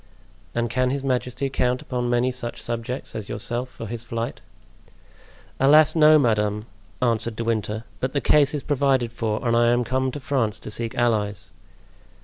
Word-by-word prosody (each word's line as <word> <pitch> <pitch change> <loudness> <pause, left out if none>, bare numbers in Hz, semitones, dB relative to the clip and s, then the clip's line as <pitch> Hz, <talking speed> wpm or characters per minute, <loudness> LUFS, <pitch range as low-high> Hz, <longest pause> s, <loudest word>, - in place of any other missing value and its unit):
"And 120 0 +1
can 125 +2 +1
his 135 +1 -2
majesty 130 0 -1
count 125 -1 0
upon 125 -1 -2
many 120 +1 +2
such 125 -2 -5
subjects 120 +2 -4
as 110 -2 -5
yourself 120 +4 -3
for 115 - -8
his 115 +1 -5
flight?" 115 0 -4 1.2
"Alas! 150 +4 +6
no, 155 -1 +7
madame," 105 -5 +1 0.4
answered 115 -1 0
De 115 - -3
Winter; 110 -1 -1 0.2
"but 130 0 -2
the 145 - +2
case 150 +1 +3
is 145 - -3
provided 135 -4 +1
for 110 0 -2
and 115 - +3
I 120 0 +4
am 120 +1 +3
come 130 +2 0
to 145 - -5
France 130 -6 -1
to - - -7
seek 115 +1 -4
allies." 105 -6 0
120 Hz, 170 wpm, -24 LUFS, 115-130 Hz, 1.2 s, no